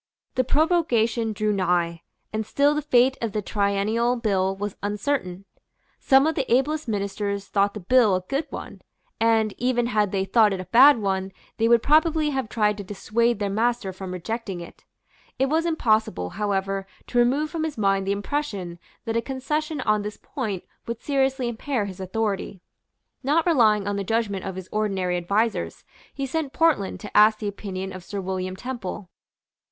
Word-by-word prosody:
The 255 Hz, -, +2 dB
prorogation 250 Hz, -7 st, +2 dB
drew 215 Hz, 0 st, 0 dB
nigh; 175 Hz, -3 st, 0 dB, 0.3 s
and 220 Hz, 0 st, -1 dB
still 285 Hz, +6 st, +2 dB
the 300 Hz, -, -1 dB
fate 260 Hz, -2 st, +3 dB
of 225 Hz, -4 st, -2 dB
the 210 Hz, -, -1 dB
Triennial 210 Hz, +4 st, +1 dB
Bill 195 Hz, -5 st, 0 dB
was 205 Hz, 0 st, -4 dB
uncertain. 205 Hz, -2 st, -2 dB, 0.5 s
Some 270 Hz, 0 st, +5 dB
of 320 Hz, -, +2 dB
the 270 Hz, -5 st, -3 dB
ablest 290 Hz, +4 st, +1 dB
ministers 200 Hz, -1 st, -2 dB
thought 200 Hz, 0 st, +1 dB
the 210 Hz, -, -6 dB
bill 220 Hz, 0 st, +4 dB
a 185 Hz, -, -1 dB
good 275 Hz, -, -3 dB
one; -, -, -8 dB, 0.4 s
and, 225 Hz, -2 st, +2 dB
even 245 Hz, -1 st, +1 dB
had 210 Hz, -4 st, +1 dB
they 195 Hz, -1 st, 0 dB
thought 210 Hz, +1 st, +4 dB
it 190 Hz, -, -4 dB
a 185 Hz, -, -5 dB
bad 255 Hz, +8 st, +7 dB
one, 190 Hz, -2 st, -1 dB, 0.3 s
they 225 Hz, -, +2 dB
would 235 Hz, -1 st, +4 dB
probably 310 Hz, 0 st, +3 dB
have 265 Hz, -5 st, -2 dB
tried 210 Hz, -2 st, +1 dB
to -, -, -4 dB
dissuade 225 Hz, +4 st, 0 dB
their 200 Hz, -1 st, -2 dB
master 225 Hz, -2 st, 0 dB
from 185 Hz, 0 st, -7 dB
rejecting 195 Hz, +1 st, -4 dB
it. 170 Hz, -, -12 dB, 0.5 s
It 270 Hz, 0 st, +1 dB
was 325 Hz, +3 st, +1 dB
impossible, 220 Hz, -, +1 dB
however, 195 Hz, -1 st, -2 dB, 0.2 s
to 245 Hz, -, 0 dB
remove 280 Hz, +6 st, +2 dB
from 330 Hz, -2 st, -2 dB
his 315 Hz, -5 st, -3 dB
mind 195 Hz, -2 st, +1 dB
the -, -, +1 dB
impression 200 Hz, -6 st, -3 dB, 0.3 s
that 225 Hz, -, -2 dB
a 230 Hz, -, +2 dB
concession 300 Hz, +4 st, -3 dB
on 215 Hz, -3 st, +2 dB
this 210 Hz, 0 st, -6 dB
point 210 Hz, -9 st, -4 dB, 0.2 s
would 235 Hz, -1 st, -4 dB
seriously 270 Hz, -2 st, +1 dB
impair 235 Hz, -1 st, -2 dB
his 190 Hz, -1 st, -8 dB
authority. 195 Hz, 0 st, -2 dB, 0.6 s
Not 300 Hz, +5 st, +2 dB
relying 220 Hz, -, +3 dB
on 205 Hz, 0 st, -1 dB
the 200 Hz, -, -2 dB
judgment 205 Hz, -2 st, -1 dB
of 190 Hz, -1 st, -4 dB
his 185 Hz, -1 st, -7 dB
ordinary 195 Hz, -4 st, 0 dB
advisers, 205 Hz, +6 st, -1 dB, 0.3 s
he 275 Hz, -, -4 dB
sent 285 Hz, 0 st, -3 dB
Portland 315 Hz, -13 st, +1 dB
to 205 Hz, -, -9 dB
ask 215 Hz, +1 st, +6 dB
the 210 Hz, -, -4 dB
opinion 195 Hz, -2 st, -5 dB
of 185 Hz, -1 st, -8 dB
Sir 200 Hz, +3 st, -5 dB
William 185 Hz, 0 st, -3 dB
Temple. 220 Hz, -4 st, -6 dB
215 Hz, 180 wpm, -24 LUFS, 195-255 Hz, 0.6 s, bad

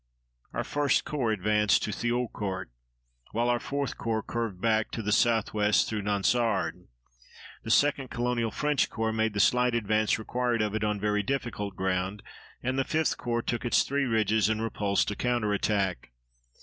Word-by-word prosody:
Our -, -, -2 dB
1st 145 Hz, -1 st, +1 dB
Corps 130 Hz, -7 st, -1 dB
advanced 105 Hz, +1 st, +2 dB
to 105 Hz, -, -2 dB
Thiaucourt, 105 Hz, -, -2 dB, 0.6 s
while 120 Hz, +2 st, +1 dB
our 120 Hz, 0 st, +2 dB
4th 140 Hz, +2 st, -3 dB
Corps 110 Hz, -1 st, -2 dB
curved 115 Hz, -6 st, -3 dB
back 110 Hz, 0 st, +1 dB
to 115 Hz, -, -3 dB
the 105 Hz, -, -1 dB
southwest 105 Hz, -2 st, +2 dB
through 110 Hz, -2 st, -2 dB
Nonsard. 105 Hz, +2 st, 0 dB, 0.7 s
The -, -, -8 dB
2d 140 Hz, +1 st, +3 dB
Colonial 120 Hz, -1 st, -1 dB
French 150 Hz, +5 st, 0 dB
Corps 110 Hz, -1 st, -2 dB
made 110 Hz, -1 st, 0 dB
the -, -, 0 dB
slight 125 Hz, +2 st, +3 dB
advance 110 Hz, -1 st, +1 dB
required 120 Hz, 0 st, -1 dB
of 105 Hz, -1 st, -2 dB
it 110 Hz, 0 st, -1 dB
on 105 Hz, -1 st, 0 dB
very 105 Hz, 0 st, +1 dB
difficult 105 Hz, -5 st, -3 dB
ground, 95 Hz, +2 st, -2 dB, 0.4 s
and 130 Hz, +2 st, 0 dB
the -, -, +3 dB
5th 160 Hz, 0 st, 0 dB
Corps 120 Hz, -1 st, -2 dB
took 120 Hz, -, -2 dB
its 120 Hz, -, +3 dB
three 140 Hz, 0 st, 0 dB
ridges 110 Hz, -3 st, +2 dB
and 110 Hz, -1 st, 0 dB
repulsed 105 Hz, -3 st, 0 dB
a -, -, -4 dB
counterattack. 105 Hz, -, 0 dB
110 Hz, 160 wpm, -28 LUFS, 105-120 Hz, 0.7 s, 2d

